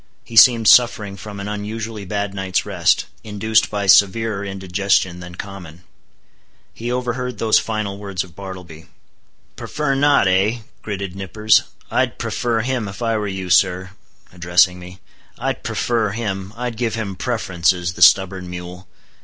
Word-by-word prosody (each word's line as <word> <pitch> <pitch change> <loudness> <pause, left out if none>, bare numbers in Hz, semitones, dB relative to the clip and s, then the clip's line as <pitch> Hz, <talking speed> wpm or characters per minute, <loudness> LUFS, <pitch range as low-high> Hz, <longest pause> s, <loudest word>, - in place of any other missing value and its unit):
He 115 - -11
seemed 115 -1 +7
suffering 105 -5 +4
from 100 +1 -9
an 100 - -5
unusually 105 +1 -5
bad 100 +1 -3
night's 95 -1 -1
rest, - - +1 0.2
induced 110 +1 +1
by 100 -1 -2
severer 100 +2 +4
indigestion 95 -2 0
than 90 0 -10
common. 90 -3 -9 0.9
He 120 +2 -5
overheard 125 0 -3
those 110 -1 +3
final 105 -3 -4
words 100 -3 -3
of 90 -3 -16
Bartleby. 90 -5 -10 0.7
"Prefer 150 -2 -2
not, 140 -6 +3
eh?" 100 +6 +1 0.2
gritted 100 -3 -5
Nippers—"I'd 105 +3 0
prefer 115 -2 -1
him, 125 -2 -2
if 100 +5 -7
I 115 -1 +1
were 105 -1 -2
you, 95 -2 -5
sir," 90 +2 +2 0.4
addressing 90 +1 +2
me—"I'd 90 -1 -8
prefer 115 -3 -1
him; 100 -4 -4
I'd 120 -2 -4
give 115 -3 -1
him 105 -4 -4
preferences, 90 -7 -1
the 90 - -10
stubborn 95 +1 +4
mule! 90 +1 -8
100 Hz, 140 wpm, -20 LUFS, 95-110 Hz, 0.9 s, seemed